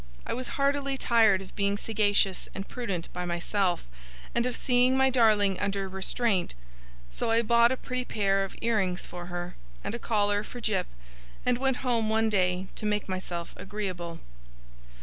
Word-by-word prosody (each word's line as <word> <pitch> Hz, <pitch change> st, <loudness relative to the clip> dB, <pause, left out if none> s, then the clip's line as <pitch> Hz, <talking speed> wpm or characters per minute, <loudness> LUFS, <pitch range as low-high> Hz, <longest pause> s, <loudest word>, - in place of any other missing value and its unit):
I -, -, -2 dB
was 255 Hz, +1 st, -3 dB
heartily 275 Hz, -1 st, +1 dB
tired 220 Hz, -6 st, +4 dB
of 185 Hz, -, -15 dB
being 200 Hz, 0 st, +1 dB
sagacious 205 Hz, -3 st, +2 dB
and 195 Hz, 0 st, -5 dB
prudent 200 Hz, -9 st, -3 dB
by 180 Hz, -, -3 dB
myself, 175 Hz, -, 0 dB, 0.5 s
and 235 Hz, +1 st, +1 dB
of 250 Hz, -, -2 dB
seeing 250 Hz, 0 st, +3 dB
my 265 Hz, 0 st, +4 dB
darling 210 Hz, -6 st, +4 dB
under 195 Hz, -1 st, -1 dB
restraint; 190 Hz, -, 0 dB, 0.6 s
so 145 Hz, -, -2 dB
I 230 Hz, +1 st, +3 dB
bought 235 Hz, +1 st, +5 dB
a 260 Hz, -, 0 dB
pretty 255 Hz, 0 st, -3 dB
pair 195 Hz, -3 st, +1 dB
of 195 Hz, -, -6 dB
ear 230 Hz, -1 st, +2 dB
rings 185 Hz, -3 st, -1 dB
for 175 Hz, 0 st, -8 dB
her, 175 Hz, 0 st, -5 dB, 0.3 s
and -, -, -3 dB
a 235 Hz, -, -4 dB
collar 205 Hz, -2 st, +1 dB
for 245 Hz, -, -9 dB
Jip, 215 Hz, -5 st, 0 dB, 0.6 s
and 250 Hz, -1 st, +2 dB
went 265 Hz, -1 st, +1 dB
home 230 Hz, -3 st, +1 dB
one 220 Hz, 0 st, +2 dB
day 185 Hz, -2 st, +1 dB
to 215 Hz, -, -2 dB
make 210 Hz, -1 st, 0 dB
myself 185 Hz, -2 st, -4 dB
agreeable. 180 Hz, -5 st, -5 dB
210 Hz, 170 wpm, -28 LUFS, 190-235 Hz, 0.6 s, bought